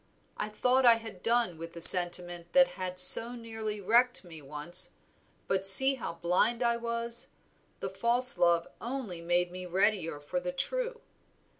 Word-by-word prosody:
I 210 Hz, -, -7 dB
thought 250 Hz, +5 st, -1 dB
I 235 Hz, -2 st, +4 dB
had 225 Hz, -5 st, -12 dB
done 230 Hz, -8 st, -2 dB
with 165 Hz, 0 st, -11 dB
the 170 Hz, -, -11 dB
sentiment 175 Hz, 0 st, +6 dB
that 270 Hz, -1 st, +3 dB
had 185 Hz, -1 st, -7 dB
so 225 Hz, +6 st, +6 dB
nearly 225 Hz, -2 st, -8 dB
wrecked 235 Hz, +5 st, -1 dB
me 165 Hz, -3 st, -14 dB
once, 150 Hz, +6 st, -5 dB, 0.5 s
but 190 Hz, 0 st, -3 dB
see 265 Hz, +8 st, +6 dB
how 260 Hz, -9 st, -8 dB
blind 180 Hz, +8 st, -2 dB
I 235 Hz, 0 st, -1 dB
was 235 Hz, 0 st, -6 dB, 0.5 s
the -, -, -6 dB
false 245 Hz, +2 st, +1 dB
love 170 Hz, -1 st, -1 dB
only 235 Hz, -9 st, -8 dB
made 175 Hz, +1 st, -2 dB
me 180 Hz, 0 st, -10 dB
readier 180 Hz, -4 st, -2 dB
for 150 Hz, +5 st, -6 dB
the 180 Hz, 0 st, -7 dB
true. -, -, -6 dB
195 Hz, 160 wpm, -27 LUFS, 175-235 Hz, 0.5 s, sentiment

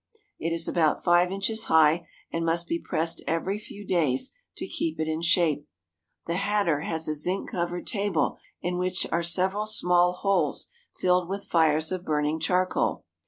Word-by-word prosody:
It 165 Hz, -, -2 dB
is 165 Hz, 0 st, +1 dB
about 160 Hz, -3 st, +1 dB
five 175 Hz, 0 st, +4 dB
inches 220 Hz, +3 st, 0 dB
high, 160 Hz, +1 st, +4 dB, 0.3 s
and 165 Hz, -, -1 dB
must 170 Hz, +1 st, 0 dB
be 170 Hz, -, -1 dB
pressed 165 Hz, 0 st, -1 dB
every 185 Hz, +5 st, -1 dB
few 205 Hz, -1 st, -10 dB
days 160 Hz, -, +1 dB, 0.3 s
to -, -, -3 dB
keep 160 Hz, -, -3 dB
it 155 Hz, -, 0 dB
in 160 Hz, +1 st, -2 dB
shape. 165 Hz, -4 st, +2 dB, 0.6 s
The 170 Hz, +1 st, -1 dB
hatter 200 Hz, -6 st, +1 dB
has 160 Hz, +1 st, -2 dB
a 155 Hz, -, 0 dB
zinc 180 Hz, +6 st, -2 dB
covered 175 Hz, 0 st, -3 dB
table 200 Hz, -7 st, 0 dB, 0.2 s
in 180 Hz, 0 st, -1 dB
which 185 Hz, 0 st, 0 dB
are 170 Hz, -, +1 dB
several 190 Hz, +5 st, +1 dB
small 180 Hz, -4 st, +3 dB
holes 195 Hz, +2 st, 0 dB, 0.3 s
filled 180 Hz, -1 st, +2 dB
with 195 Hz, +1 st, -4 dB
fires 160 Hz, -3 st, +2 dB
of 185 Hz, -1 st, -3 dB
burning 150 Hz, -1 st, 0 dB
charcoal. 180 Hz, +3 st, 0 dB
175 Hz, 165 wpm, -26 LUFS, 160-185 Hz, 0.6 s, five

